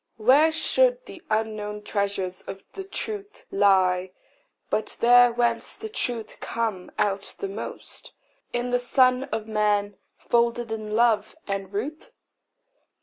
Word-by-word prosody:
Where 270 +8 +5
should - - +2
the 365 - -11
unknown 215 -1 -2
treasures 200 -3 -2
of 195 0 -7
the 390 - -6
truth 410 +1 -6
Lie, 185 -2 +3 0.6
but 215 - -1
there 245 +1 +7
whence 235 -1 0
the 440 - -7
truth 245 - -3
comes 220 -6 -3
out 200 -1 -1
the 400 - -3
most 390 - -8 0.4
In 245 +1 -2
the 245 - +3
Son 255 +1 +3
of 220 -5 -4
man, 210 -2 +1 0.2
folded 235 -1 +1
in 215 -1 -3
love 220 -2 +2
and 195 -1 -3
ruth? 290 - -4
225 Hz, 130 wpm, -25 LUFS, 205-255 Hz, 0.6 s, there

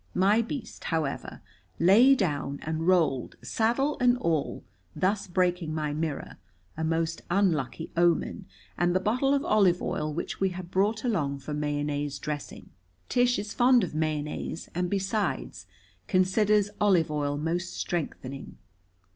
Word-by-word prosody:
My 200 +5 +4
beast, 235 +2 -6
however, 160 -4 -3 0.3
lay 225 +10 +6
down 145 - -1
and 160 +1 -2
rolled, 160 -9 +2
saddle 270 +7 0
and 250 -1 +4
all, 165 - -1 0.3
thus 200 +2 0
breaking 175 -3 0
my 150 -2 -2
mirror 155 -1 -4 0.4
a 160 - -3
most 165 +1 -1
unlucky 165 -6 0
omen 170 -1 +1 0.3
and 175 0 +2
the - - +4
bottle 250 +8 +1
of 280 - -1
olive 190 -5 +4
oil 150 0 -2
which 155 - -4
we 195 - +2
had 180 -1 -8
brought 210 +4 +1
along 155 - 0
for 140 +2 -7
mayonnaise 145 -1 -2
dressing. 145 +1 -6 0.4
Tish 245 0 +3
is 205 +1 -4
fond 245 -1 +5
of 175 - -3
mayonnaise, 155 0 -3
and, 180 +1 -1
besides, 200 +2 -2 0.4
considers 205 +2 +3
olive 185 -7 +3
oil 145 -1 -1
most 170 +4 -2
strengthening. 140 -5 -4
175 Hz, 140 wpm, -28 LUFS, 155-205 Hz, 0.4 s, lay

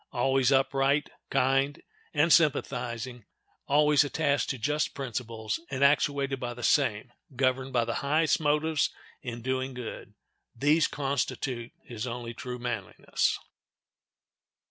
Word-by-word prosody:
Always 135 +1 +2
upright, 135 +2 +2 0.2
kind, 135 +1 +2 0.3
and 155 +3 +4
sympathizing; 125 -6 +1 0.4
always 150 0 +5
attached 145 0 0
to 135 - -2
just 150 +6 -1
principles, 115 -4 -4
and 135 0 -1
actuated 140 -1 +2
by 120 -1 -4
the 120 - -8
same, 110 +3 +2 0.2
governed 130 +1 +1
by 120 -2 +2
the 115 - -2
highest 155 +3 +2
motives 150 0 +1 0.3
in 120 -3 -6
doing 130 0 -2
good; 125 -2 -7 0.4
these 150 +6 +3
constitute 135 -3 -2
his 120 -1 -6
only 120 -1 -5
true 125 +1 -6
manliness. 120 -6 -1
135 Hz, 120 wpm, -28 LUFS, 120-145 Hz, 0.4 s, always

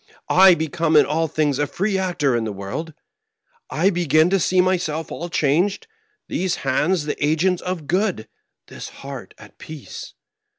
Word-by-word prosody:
I 190 -1 +8
become 160 0 -1
in 150 - +7
all 160 +2 0
things 150 -3 0
a 145 - +1
free 195 +6 -1
actor 175 -8 0
in 115 - 0
the 110 - -3
world; 100 +12 -6 0.7
I 185 +6 +2
begin 170 -1 +2
to 195 - +3
see 185 +2 +1
myself 175 -4 0
all 175 - -5
changed, 170 +7 +1 0.4
these 185 0 -1
hands 150 +4 +1
the 150 - -3
agents 165 +4 +1
of 180 -4 -4
good, 180 - -1 0.4
this - - -9
heart - - -10
at - - -16
peace. 155 - -9
165 Hz, 160 wpm, -21 LUFS, 150-185 Hz, 0.7 s, I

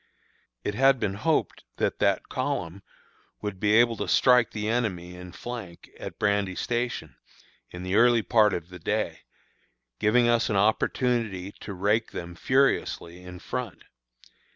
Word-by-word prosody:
It 105 - -2
had 135 +3 +4
been 95 - -1
hoped 155 +11 -1
that - - -1
that - - +1
column 100 - -3 0.6
would 105 -3 -5
be 105 +1 +2
able 120 0 +5
to - - -3
strike 125 -3 +4
the 105 -1 -4
enemy 100 -7 -1
in 90 0 -10
flank 110 -5 -8
at - - -7
Brandy 100 -2 0
Station, 120 +3 -3 0.5
in 90 0 -8
the 95 +1 -3
early 115 +1 +5
part 110 -3 +4
of 85 0 -6
the 90 0 -10
day, - - -2 0.8
giving 120 +3 +3
us 120 0 +2
an 105 - 0
opportunity 110 -1 +1
to 100 - -7
rake 105 +4 0
them 85 0 -6
furiously 90 -7 0
in 90 0 -10
front. 120 +3 -5
105 Hz, 150 wpm, -26 LUFS, 95-120 Hz, 0.8 s, able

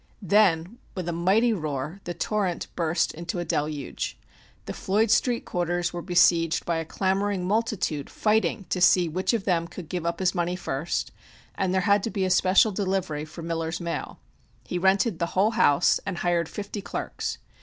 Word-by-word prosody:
Then 195 +1 +3 0.2
with 180 -3 -4
a - - 0
mighty 195 +8 +3
roar 155 0 -4
the 175 - -4
torrent 200 -5 -1
burst 170 0 0
into 170 +2 -5
a 175 - -2
deluge. 150 -2 -3 0.5
The - - -5
Floyd 210 +3 +1
Street 240 0 +2
quarters 175 0 -1
were 175 - -4
besieged 170 -2 +3
by 170 -1 0
a 165 - -3
clamoring 195 +1 -1
multitude 205 -9 -1
fighting 215 -1 +1
to 180 - -1
see 180 -1 +5
which 180 +4 0
of 230 -4 -1
them 170 -3 +1
could 170 -2 -9
give 180 -3 -3
up 170 0 -1
his 185 -2 +1
money 175 0 -1
first, 170 -2 -3 0.4
and 190 -2 -1
there 190 0 +2
had 200 +1 +3
to 225 - -2
be 195 -2 -1
a 185 - 0
special 185 +4 +4
delivery 185 -6 -2
for 160 +2 -10
Miller's 165 0 -2
mail. 170 -1 -4 0.5
He 180 - -3
rented 190 +1 +2
the 170 - 0
whole 205 +4 +4
house 180 -9 +4
and 195 -3 -4
hired 170 -2 0
fifty 205 0 -6
clerks. - - -4
180 Hz, 180 wpm, -26 LUFS, 170-200 Hz, 0.5 s, see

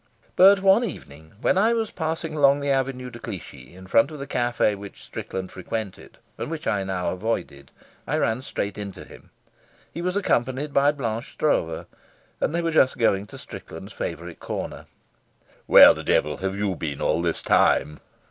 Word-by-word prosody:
But 195 +1 +7
one 195 +5 +5
evening 80 - -8
when 185 - +3
I 225 +4 +4
was 225 -1 -2
passing 160 -1 -3
along 140 -1 +4
the 140 0 -1
Avenue 130 -2 -1
de 120 - -10
Clichy 95 -5 -9
in 95 0 -12
front 115 +8 +3
of 155 - -8
the 140 - -6
cafe 120 -5 +1
which 100 0 -10
Strickland 95 -1 -6
frequented 100 +1 -6 0.2
and - - -4
which 160 -1 -5
I 100 -3 0
now 95 -2 -2
avoided, 90 -9 -4 0.4
I - - 0
ran 110 +3 0
straight 105 -6 -4
into 100 -3 -7
him. - - -15 0.6
He 170 - -5
was 180 +2 -1
accompanied 135 -5 0
by 140 +1 +4
Blanche 120 -5 -4
Stroeve, 80 - 0 0.5
and 160 - -1
they 170 - 0
were 165 - 0
just 135 -5 +3
going 105 -4 +1
to - - -11
Strickland's - - -10
favourite - - -6
corner. - - -6 0.8
"Where - - +9
the - - -7
devil 75 +1 +1
have 95 +1 -3
you 100 -2 -1
been 75 -4 -4
all 85 - +1
this 85 -1 -1
time?" 75 0 +2
120 Hz, 175 wpm, -24 LUFS, 95-150 Hz, 0.8 s, Where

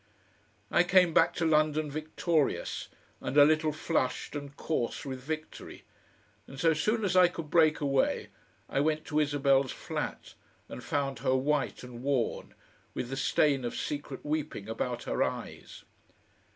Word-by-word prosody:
I - - +5
came 180 -1 +4
back - - +4
to 165 - 0
London 155 -1 +2
victorious, 155 0 -1 0.3
and 140 - -3
a 145 - +9
little 155 0 +2
flushed 150 -4 -2
and 140 -1 -7
coarse 135 -6 -2
with 130 -2 -5
victory; 155 +3 -7 0.6
and 135 - -10
so 165 +2 +4
soon 215 +8 0
as 185 - 0
I 180 -1 +7
could 165 -3 -7
break 160 -2 +4
away 140 -2 +1 0.4
I - - -1
went 155 +1 0
to 155 -1 0
Isabel's 140 -3 +2
flat - - -5 0.3
and - - -8
found 135 -3 -2
her 130 +1 +1
white 140 +1 0
and 120 -1 -9
worn, 135 -3 -1 0.4
with 120 - -3
the 135 - -3
stain 135 0 +2
of 120 - -3
secret 145 -2 -5
weeping 150 -8 -3
about 120 +2 -3
her - - -2
eyes. - - -4
145 Hz, 150 wpm, -30 LUFS, 135-155 Hz, 0.6 s, a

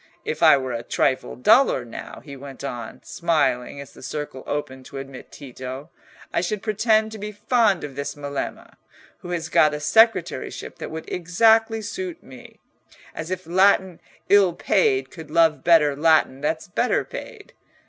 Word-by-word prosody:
If - - -4
I - - +7
were 130 -1 -4
a 115 - -3
trifle 130 +2 -1
duller, 130 - +4
now," 115 - -9
he 140 -2 -9
went 135 0 -10
on, 120 -5 -6
smiling 140 -6 0
as 140 - -10
the - - -15
circle 135 -1 -6
opened 135 -3 -4
to - - -9
admit 135 -1 -9
Tito, 130 +2 -9 0.4
"I - - +1
should 195 +3 -3
pretend 220 0 +2
to 220 - -8
be 210 +1 -5
fond 210 -2 +1
of 140 -3 -7
this 140 0 -4
Melema, 140 -1 -6 0.4
who 175 - -10
has 175 -2 -3
got 150 -1 +3
a - - -5
secretaryship 220 +10 +1
that - - -6
would 160 0 -7
exactly 220 +5 +2
suit 360 - -6
me—as 155 +1 -13
if 185 -1 -4
Latin 190 0 +3 0.3
ill 200 -3 +5
paid 400 - +1
could 160 -4 -11
love 165 -1 +3
better 155 -4 +4
Latin 150 -3 +3
that's 160 +2 -2
better 235 +8 0
paid! 435 -4 -10
160 Hz, 160 wpm, -23 LUFS, 140-210 Hz, 0.4 s, I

